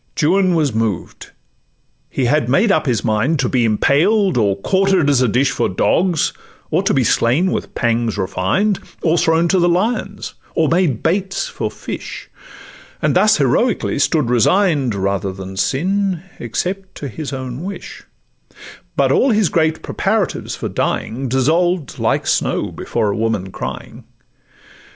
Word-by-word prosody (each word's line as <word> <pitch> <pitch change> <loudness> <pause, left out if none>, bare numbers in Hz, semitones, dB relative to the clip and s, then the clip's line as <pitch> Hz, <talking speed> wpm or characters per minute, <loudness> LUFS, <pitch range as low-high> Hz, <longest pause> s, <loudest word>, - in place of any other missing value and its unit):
Juan 185 +3 +3
was 150 -6 +1
moved; 110 -5 -3 0.8
he 130 - -1
had 135 -1 +1
made 195 - +3
up 155 -4 +1
his 120 -4 0
mind 120 +8 +1
To 130 -2 0
be 125 -2 +1
impaled, 165 - +2
or 105 -5 +2
quarter'd 190 - +2
as 130 -3 +3
a 125 - +3
dish 125 +5 +2
For - - 0
dogs, 170 - +1 0.4
or - - +2
to - - 0
be - - +3
slain 150 +11 +2
with - - -4
pangs 115 -2 0
refined, 100 - 0 0.2
Or 165 -1 +3
thrown 165 0 +2
to 190 - +3
lions, 180 +7 0 0.2
or 160 -3 +2
made 165 - +1
baits 190 - 0
for - - -4
fish, - - -8 0.7
And - - +1
thus 215 +1 +4
heroically 150 - +1
stood 145 -5 +1
resign'd, 140 - +2
Rather 100 0 -1
than 95 0 -8
sin—except 185 - -2
to 145 - -6
his 145 +4 -6
own 130 0 -5
wish: 195 +3 -8 0.9
But - - +2
all 270 - +3
his 215 -6 +2
great 160 -1 0
preparatives - - -1
for - - -4
dying 130 +3 -2
Dissolved 160 +4 +1
like - - 0
snow - - 0
before 105 -2 -2
a - - -2
woman 110 -4 -2
crying. - - -7
150 Hz, 145 wpm, -18 LUFS, 115-185 Hz, 0.9 s, thus